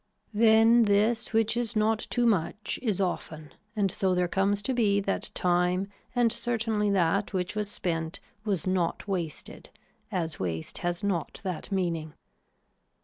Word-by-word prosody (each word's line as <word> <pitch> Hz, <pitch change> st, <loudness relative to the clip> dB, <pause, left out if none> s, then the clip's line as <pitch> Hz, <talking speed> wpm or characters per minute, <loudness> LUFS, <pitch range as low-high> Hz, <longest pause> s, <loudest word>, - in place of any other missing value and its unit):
Then 225 Hz, +2 st, +6 dB
this 215 Hz, +3 st, +2 dB
which 225 Hz, 0 st, +2 dB
is 240 Hz, -1 st, -2 dB
not 215 Hz, 0 st, +2 dB
too 245 Hz, -1 st, +1 dB
much 205 Hz, 0 st, 0 dB
is 215 Hz, -7 st, 0 dB
often 155 Hz, -5 st, -3 dB, 0.2 s
and 200 Hz, -3 st, +1 dB
so 185 Hz, 0 st, +1 dB
there 180 Hz, 0 st, +2 dB
comes 200 Hz, +3 st, +1 dB
to 265 Hz, -, 0 dB
be 210 Hz, -5 st, +3 dB
that 195 Hz, 0 st, -1 dB
time 180 Hz, +2 st, +1 dB, 0.3 s
and 240 Hz, -2 st, +3 dB
certainly 225 Hz, -3 st, 0 dB
that 200 Hz, +2 st, +1 dB
which 185 Hz, +1 st, -2 dB
was 210 Hz, -1 st, -1 dB
spent 165 Hz, -4 st, -2 dB, 0.2 s
was 200 Hz, -7 st, -1 dB
not 185 Hz, 0 st, -1 dB
wasted 175 Hz, -6 st, -4 dB, 0.4 s
as 165 Hz, -5 st, -2 dB
waste 80 Hz, -3 st, -3 dB
has 175 Hz, +3 st, -2 dB
not 185 Hz, -6 st, -2 dB
that 185 Hz, 0 st, -4 dB
meaning. 165 Hz, -5 st, -2 dB
200 Hz, 145 wpm, -28 LUFS, 175-220 Hz, 0.4 s, Then